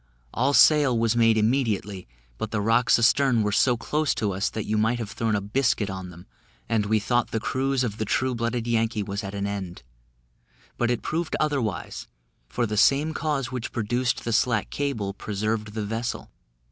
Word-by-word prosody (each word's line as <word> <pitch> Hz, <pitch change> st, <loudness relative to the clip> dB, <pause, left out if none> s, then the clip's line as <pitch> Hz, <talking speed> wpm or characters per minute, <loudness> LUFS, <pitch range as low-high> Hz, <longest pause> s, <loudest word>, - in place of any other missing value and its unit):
All 140 Hz, -, +1 dB
sail 145 Hz, -6 st, +5 dB
was 115 Hz, 0 st, +1 dB
made 115 Hz, -1 st, +4 dB
immediately, 105 Hz, -, 0 dB, 0.3 s
but 110 Hz, -, -3 dB
the 105 Hz, -, -2 dB
rocks 115 Hz, +4 st, +3 dB
astern 120 Hz, 0 st, +3 dB
were 105 Hz, -, 0 dB
so 120 Hz, +4 st, +3 dB
close 150 Hz, +5 st, -1 dB
to 105 Hz, -3 st, -1 dB
us, 95 Hz, +2 st, -1 dB
that 110 Hz, -, -5 dB
you 110 Hz, -, -1 dB
might 110 Hz, +3 st, +2 dB
have 110 Hz, -3 st, -5 dB
thrown 110 Hz, -2 st, -1 dB
a 100 Hz, -, 0 dB
biscuit 105 Hz, -1 st, 0 dB
on 95 Hz, -1 st, -6 dB
them, 90 Hz, 0 st, -13 dB, 0.4 s
and 110 Hz, -2 st, 0 dB
we 110 Hz, +1 st, +3 dB
thought 120 Hz, +3 st, 0 dB
the 110 Hz, -, -2 dB
cruise 135 Hz, +2 st, 0 dB
of 110 Hz, -3 st, -3 dB
the -, -, 0 dB
True 130 Hz, +5 st, 0 dB
blooded 115 Hz, 0 st, -2 dB
Yankee 115 Hz, -2 st, 0 dB
was 100 Hz, +1 st, -4 dB
at 100 Hz, +1 st, -6 dB
an 100 Hz, 0 st, -2 dB
end; 100 Hz, -3 st, -5 dB, 0.9 s
but 120 Hz, -, 0 dB
it 120 Hz, -2 st, -1 dB
proved 165 Hz, 0 st, -2 dB
otherwise, 140 Hz, -10 st, -2 dB, 0.4 s
for 120 Hz, -, -1 dB
the 105 Hz, -1 st, -3 dB
same 145 Hz, +8 st, +3 dB
cause 140 Hz, -6 st, -2 dB
which 125 Hz, -2 st, -4 dB
produced 120 Hz, +2 st, -1 dB
the 115 Hz, -, -2 dB
slack 120 Hz, -2 st, +1 dB
cable 115 Hz, -9 st, -2 dB
preserved 105 Hz, +1 st, -3 dB
the 110 Hz, -2 st, -2 dB
vessel. 115 Hz, +4 st, -4 dB
115 Hz, 190 wpm, -25 LUFS, 105-125 Hz, 0.9 s, sail